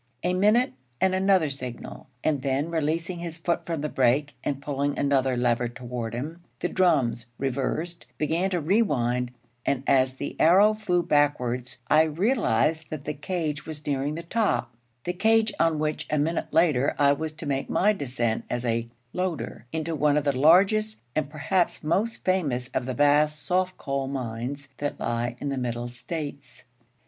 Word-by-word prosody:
A 180 - +1
minute, 210 - +3 0.3
and 190 0 +3
another 185 -5 +3
signal; 125 -3 -7 0.2
and 145 -4 +1
then, 140 +4 -1
releasing 165 +2 -1
his 170 -1 -5
foot 170 0 -1
from 165 -3 -2
the 150 - -1
brake, 135 +2 +2
and 140 -1 -2
pulling 140 0 -2
another 135 -2 +2
lever 120 0 +1
toward 120 -1 -5
him, 155 +8 -5 0.2
the - - 0
drums, 130 -10 +2
reversed, 140 +6 -2
began 165 +5 0
to 180 -2 0
rewind; 125 - +1 0.3
and 135 -1 0
as 130 -1 +3
the 140 - -5
arrow 195 +6 +6
flew 180 -5 0
backwards, 125 -6 +1
I 155 - +6
realized 160 - +1
that 150 -2 -6
the 150 - -2
cage 150 -1 -3
was 150 -2 -7
nearing 145 +1 -1
the 170 - -5
top 170 - 0 0.3
the 180 - -2
cage 220 +3 +3
on 165 -1 +3
which 155 0 -2
a 150 - +1
minute 160 +3 -1
later 150 -5 +3
I 140 -1 +5
was 155 +2 -3
to 155 - -9
make 135 -1 -2
my 210 +3 +3
descent 120 - -1
as 120 0 -2
a 115 0 0 0.3
'loader' 175 -10 -3
into 160 +1 -2
one 150 0 +3
of 150 - +1
the 140 -2 +1
largest, 195 +9 +4 0.2
and 150 -2 0
perhaps 165 +5 0
most 200 +9 0
famous, 140 -10 0
of 130 -1 -2
the 130 - -2
vast 150 +1 +3
soft 185 +4 0
coal 135 -1 -2
mines 130 +1 -4
that 145 0 -3
lie 120 +1 -1
in 140 - -3
our 135 - -2
Middle 120 -1 -3
States. 135 0 -7
150 Hz, 170 wpm, -26 LUFS, 130-170 Hz, 0.3 s, arrow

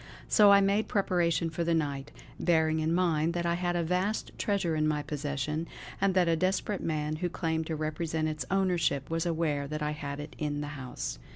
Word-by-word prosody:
So 205 -2 +6
I 200 0 +7
made 200 +2 +2
preparation 170 -4 +1
for 170 +1 -2
the 170 0 +2
night, 140 -4 -2 0.3
bearing 160 -2 +2
in 155 +1 0
mind 170 -2 +2
that 170 0 -1
I 170 - +2
had 175 0 -1
a 170 - +1
vast 185 +6 -1
treasure 195 -6 0
in 155 0 +2
my 150 -1 0
possession, 150 +2 -3 0.3
and 195 -1 +2
that 180 -2 +4
a 165 - +3
desperate 185 +3 0
man 155 -1 -1
who 175 +2 -1
claimed 160 -2 -2
to 160 - -2
represent 155 +1 -2
its 155 -3 -3
ownership 175 -7 +1
was 165 +1 0
aware 155 -4 0
that 155 +1 -3
I 150 - 0
had 145 -1 -5
it 150 +1 -8
in 145 -1 -1
the 145 - -4
house. 130 - -5
160 Hz, 205 wpm, -30 LUFS, 150-175 Hz, 0.3 s, I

